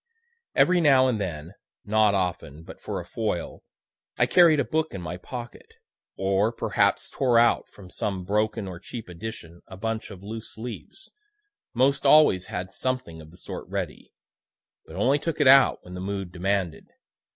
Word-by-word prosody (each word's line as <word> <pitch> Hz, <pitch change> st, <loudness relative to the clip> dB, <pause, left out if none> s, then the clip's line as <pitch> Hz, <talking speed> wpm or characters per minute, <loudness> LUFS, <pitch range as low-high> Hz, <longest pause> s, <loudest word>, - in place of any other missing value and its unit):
Every 180 Hz, -1 st, +4 dB
now 135 Hz, -4 st, +5 dB
and 115 Hz, -5 st, 0 dB
then, 85 Hz, -2 st, -5 dB, 0.3 s
(not 105 Hz, -1 st, +3 dB
often, 85 Hz, -5 st, -3 dB
but -, -, -12 dB
for -, -, -4 dB
a -, -, -8 dB
foil,) 105 Hz, -7 st, -3 dB, 0.6 s
I -, -, +4 dB
carried 170 Hz, -4 st, +5 dB
a -, -, +1 dB
book 160 Hz, -6 st, -1 dB
in 95 Hz, -, -5 dB
my 90 Hz, +1 st, -5 dB
pocket 120 Hz, +5 st, -9 dB, 0.4 s
or 95 Hz, +3 st, +1 dB
perhaps 115 Hz, -, 0 dB
tore 125 Hz, -4 st, +1 dB
out 120 Hz, 0 st, +3 dB
from 95 Hz, -3 st, -15 dB
some 95 Hz, -3 st, -3 dB
broken 105 Hz, +1 st, 0 dB
or 90 Hz, -2 st, -7 dB
cheap 115 Hz, +4 st, -8 dB
edition 90 Hz, -2 st, -9 dB
a 95 Hz, -, -10 dB
bunch 115 Hz, +2 st, -3 dB
of 100 Hz, -2 st, -11 dB
loose 110 Hz, +2 st, -8 dB
leaves; 120 Hz, -, -9 dB, 0.6 s
most 135 Hz, +3 st, +2 dB
always 140 Hz, -10 st, +5 dB
had 95 Hz, +1 st, -5 dB
something 130 Hz, -10 st, -3 dB
of 75 Hz, -, -14 dB
the 85 Hz, -, -17 dB
sort -, -, -8 dB
ready, -, -, -5 dB, 0.8 s
but 80 Hz, -, -11 dB
only 130 Hz, +9 st, +2 dB
took 165 Hz, +2 st, -3 dB
it 145 Hz, -, +4 dB
out 135 Hz, 0 st, +6 dB
when 90 Hz, -, -11 dB
the 90 Hz, -, -6 dB
mood 95 Hz, -2 st, -4 dB
demanded. 95 Hz, -1 st, -2 dB
105 Hz, 170 wpm, -25 LUFS, 90-125 Hz, 0.8 s, out